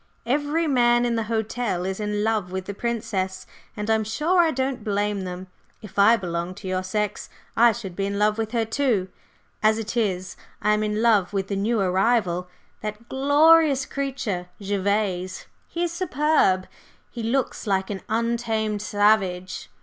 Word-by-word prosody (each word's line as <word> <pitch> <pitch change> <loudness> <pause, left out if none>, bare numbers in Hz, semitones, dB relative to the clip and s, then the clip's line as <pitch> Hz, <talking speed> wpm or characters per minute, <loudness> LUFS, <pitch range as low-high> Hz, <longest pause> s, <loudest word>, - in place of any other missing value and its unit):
"Every 290 +6 +1
man 240 -4 +3
in 240 - 0
the 225 -1 -1
hotel 220 -4 -1
is 190 +1 -3
in 210 0 -1
love 215 -5 0
with 190 0 -4
the 200 - -5
Princess, 195 -4 -3 0.3
and 210 0 -3
I'm 220 0 +2
sure 305 - +2
I 335 - +3
don't 265 -2 -2
blame 205 -2 -1
them. 180 0 -6 0.4
If 205 -1 -6
I 225 +4 +7
belonged 175 -1 -4
to 195 - -8
your 185 0 0
sex 210 +2 -2 0.3
I 235 +1 +6
should 200 -5 -7
be 195 +1 -1
in 200 0 -3
love 210 +1 +2
with 220 -1 -2
her 230 -2 +1
too. 225 -5 0 0.5
As 215 0 +4
it 225 +1 -4
is, 190 -5 -1 0.2
I 210 +1 +2
am 210 - +1
in 215 +1 -1
love 210 -5 +3
with 195 -1 -2
the 200 - -1
new 215 +4 0
arrival, 185 -1 +1 0.3
that 215 +2 -6
glorious 285 0 +5
creature, 260 -12 -3
Gervase. 200 -2 -1 0.2
He 345 - -3
is 345 - -1
superb! 300 - +2 0.4
He 235 - -6
looks 240 +1 -1
like 190 0 0
an 195 - -5
untamed 225 -2 0
savage. 205 -4 +1
215 Hz, 170 wpm, -24 LUFS, 195-240 Hz, 0.5 s, I